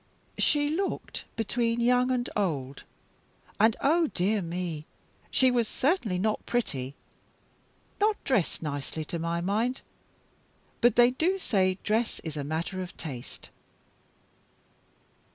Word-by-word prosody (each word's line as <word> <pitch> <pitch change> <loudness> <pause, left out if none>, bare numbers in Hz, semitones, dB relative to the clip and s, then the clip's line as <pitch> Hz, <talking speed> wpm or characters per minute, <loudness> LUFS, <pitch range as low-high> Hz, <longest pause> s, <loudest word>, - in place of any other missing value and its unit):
"She 290 -1 +3
looked 380 +5 -3
between 230 +1 0
young 250 +1 +3
and 250 -1 0
old. 140 -9 -2 0.7
And, 220 +1 +5
oh 325 +3 +4
dear 205 -1 0
me, 170 -3 -4 0.4
she 260 -1 +4
was 240 -2 +2
certainly 255 - +1
not 215 +3 0
pretty. 140 - -2 1.0
Not 420 +1 +3
dressed 215 - 0
nicely, 150 +1 -4
to 170 - -4
my 170 +1 -1
mind; 220 +8 0 1.0
but 240 -1 +5
they 240 0 +6
do 340 +9 +1
say 185 - +1
dress 220 +2 0
is 160 -2 -5
a 145 - -3
matter 165 +6 -3
of 180 - -8
taste." 130 -6 -8
215 Hz, 120 wpm, -28 LUFS, 170-250 Hz, 1.0 s, they